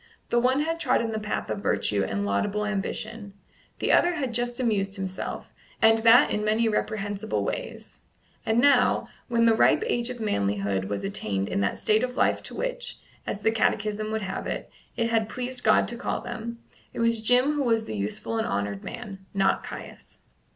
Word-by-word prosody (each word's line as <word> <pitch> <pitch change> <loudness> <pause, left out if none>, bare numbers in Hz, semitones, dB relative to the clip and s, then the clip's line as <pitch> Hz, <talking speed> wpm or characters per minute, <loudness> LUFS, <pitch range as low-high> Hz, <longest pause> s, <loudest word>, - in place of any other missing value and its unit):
The 240 - +3
one 260 +4 +2
had 330 +2 -1
trodden 230 -7 +1
the 220 - -2
path 210 0 -3
of - - -2
virtue 105 - +1
and 100 +1 -2
laudable 200 - 0
ambition; 210 +1 -4 0.4
the - - 0
other 350 0 +4
had 265 -7 -2
just 240 +1 -1
amused 200 -5 0
himself, 190 -2 -5 0.3
and 225 0 +5
that 230 +2 +6
in 210 - 0
many 220 +2 +2
reprehensible 210 -1 -1
ways; - - -5 0.4
and 220 +1 +2
now, 255 0 +4 0.2
when 235 -1 +2
the 230 - +6
ripe 225 - +4
age 240 - 0
of 250 -1 -6
manhood 100 - 0
was 100 +1 -3
attained 105 - -2
in - - -1
that 100 - 0
state 215 +1 +2
of 250 0 -3
life - - +2
to - - -7
which - - -3 0.3
as 200 - -3
the 220 - +3
Catechism 215 -1 0
would 220 -1 -2
have 190 0 -4
it - - -4 0.3
it 230 -1 0
had 220 -1 +1
pleased 250 +1 -4
God - - +4
to 240 - -4
call 245 - -2
them, 235 -1 -6 0.4
it - - -4
was 230 -1 +2
Jim 245 +5 +4
who 295 -1 -1
was 225 -4 +1
the - - -5
useful 105 - -2
and 220 - -1
honoured 100 0 -2
man, 205 -5 -8
not 195 -1 +2
Caius. - - -10
220 Hz, 190 wpm, -26 LUFS, 195-240 Hz, 0.4 s, that